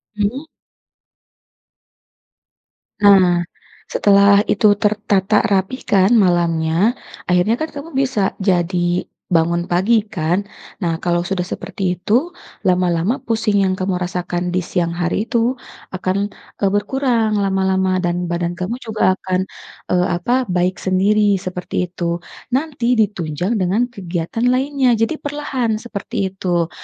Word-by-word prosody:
Hmm. 210 +7 -1 2.6
Nah, 185 -4 +6 0.5
setelah 200 0 +5
itu 205 0 +3
tertata 205 -1 +2
rapi 195 +6 0
kan 195 +3 +3
malamnya, 175 0 +2 0.3
akhirnya 180 +5 +2
kan 315 - -1
kamu 285 +3 -7
bisa 260 -5 +1 0.2
jadi 180 -2 0 0.2
bangun 170 +1 +2
pagi 205 +6 +2
kan? 185 -1 -1 0.3
Nah, 170 -4 -2
kalau 175 0 0
sudah 190 0 -1
seperti 180 0 -3
itu, 240 - +1 0.3
lama-lama 180 +4 +1
pusing 215 -3 +1
yang 185 - +1
kamu 185 0 -1
rasakan 180 0 -3
di 185 - +1
siang 170 -1 -1
hari 175 +4 -1
itu, 240 +1 0 0.3
akan, 190 +2 -2 0.3
eee, 195 - +3
berkurang 220 0 +1
lama-lama 190 -1 +1
dan 175 -1 -1
badan 170 0 -1
kamu 185 +7 -4
juga 215 -6 0
akan, 185 0 -1 0.5
eee, 180 0 +2
apa? 240 +11 0
Baik 180 -2 0
sendiri 205 +2 +2
seperti 180 0 -3
itu. 170 -1 -3 0.3
Nanti 265 -3 0
ditunjang 195 -3 0
dengan 205 +6 +1
kegiatan 185 0 -3
lainnya, 260 0 +2
jadi 225 +7 0
perlahan 265 -7 -2
seperti 200 -4 -3
itu. 175 -3 -1
190 Hz, 120 wpm, -19 LUFS, 180-220 Hz, 2.6 s, Nah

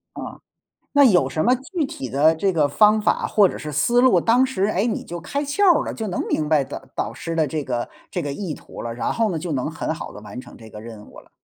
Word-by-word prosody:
啊， - - -7 0.6
那 285 -1 +6
有 175 - +4
什 155 - -1
么 250 +2 +4
具 295 +5 -3
体 130 - -7
的 150 +5 +3
这 195 +4 +1
个 155 -5 +2
方 210 +8 +4
法 - - +1
或 205 -3 +4
者 - - -6
是 150 - -6
思 235 - +2
路， 260 0 +5
当 245 +3 +3
时， 230 -7 -1
诶， 205 +1 0
你 225 - -2
就 175 0 -7
开 285 - -3
窍 290 +9 0 0.2
儿 - - -3
了， - - -4
就 220 - -4
能 185 - -2
明 155 -1 -1
白 150 -3 +3
导 135 - -8
导 105 - -3
师 165 +8 -5
的 155 -2 +2
这 155 +1 -3
个 120 -3 -3 0.2
这 175 - -2
个 145 - -4
意 180 -1 -4
图 - - -10
了， 115 - -4
然 120 - -2
后 225 -3 +1
呢， 165 - -2
就 170 +1 -5
能 140 +3 -2
很 160 - -3
好 165 - -7
地 - - -10
完 120 - -9
成 120 - -14
这 110 -1 -13
个 105 - -10
任 110 -2 -10
务 - - -14
了。 - - -22
165 Hz, 295 characters per minute, -22 LUFS, 140-220 Hz, 0.6 s, 那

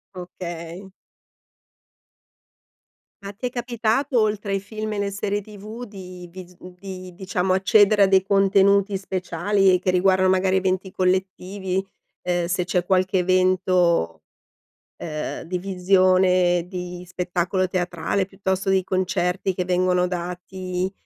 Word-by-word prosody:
Okay. 175 +1 -8 2.3
Ma 200 - -6
ti 215 +5 -8
è - - -4
capitato, 240 +2 0
oltre 210 -1 0
ai 195 - +1
film 215 +2 -6
e - - -4
le 200 - -1
serie 200 +1 -2
TV, 215 +3 -9
di 185 -4 -10
vis 180 0 -12 0.2
di, 185 -1 -9
diciamo, 185 0 -1
accedere 205 +2 +4
a - - +7
dei 190 0 +4
contenuti 195 +1 +3
speciali 190 0 +1
che 185 - 0
riguardano 185 +1 +3
magari 190 0 +2
eventi 190 0 -1
collettivi, 185 +1 -1 0.4
ehm, 175 -1 -1
se 180 0 -1
c'è 180 0 0
qualche 185 0 +2
evento, 180 - +2 0.7
ehm, 155 -1 -5
di 180 +2 -3
visione 185 -1 +3
di 180 -1 -7
spettacolo 180 +1 -1
teatrale, 180 +1 -1
piuttosto 195 0 -2
di 190 -1 +2
concerti 185 0 -1
che 180 - -2
vengono 180 0 +1
dati, 180 +1 -4
185 Hz, 125 wpm, -23 LUFS, 180-195 Hz, 2.3 s, a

